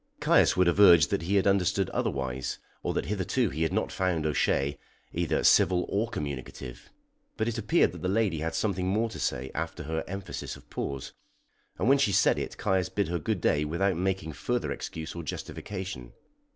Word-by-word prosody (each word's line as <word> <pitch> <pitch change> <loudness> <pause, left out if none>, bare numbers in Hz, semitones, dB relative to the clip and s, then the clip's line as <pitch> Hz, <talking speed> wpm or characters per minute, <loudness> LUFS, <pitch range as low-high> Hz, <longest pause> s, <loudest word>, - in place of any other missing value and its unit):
Caius - - +4
would 90 - +5
have 85 +3 +2
urged 85 -7 +7
that - - +1
he 90 +5 -1
had 100 - +3
understood 95 -1 +2
otherwise, 65 -2 -2 0.2
or - - -1
that - - -1
hitherto 105 +3 0
he 80 - -4
had 80 - +1
not - - -1
found 90 -4 0
O'Shea 70 -2 +1 0.3
either - - 0
civil 90 0 +5
or 110 +4 0
communicative; 70 - -6 0.5
but 110 - 0
it 115 -1 -2
appeared 115 +11 +3
that - - -10
the 90 - -1
lady 100 -5 +1
had 80 +2 -3
something 95 -4 0
more 110 +4 +1
to - - -7
say 65 +2 -2
after - - -4
her 80 +2 -2
emphasis 100 0 -5
of - - -16
pause, 70 -1 -4 0.7
and 95 - 0
when 140 +2 +5
she 120 -7 +3
said - - +3
it - - -5
Caius 95 -1 0
bid 100 -5 -1
her 85 0 -1
good 100 +3 -2
day 75 0 +2
without 85 +5 0
making 90 -3 -2
further 120 +8 -2
excuse 80 0 -5
or 85 - -5
justification. 80 -3 -6
90 Hz, 190 wpm, -28 LUFS, 80-100 Hz, 0.7 s, urged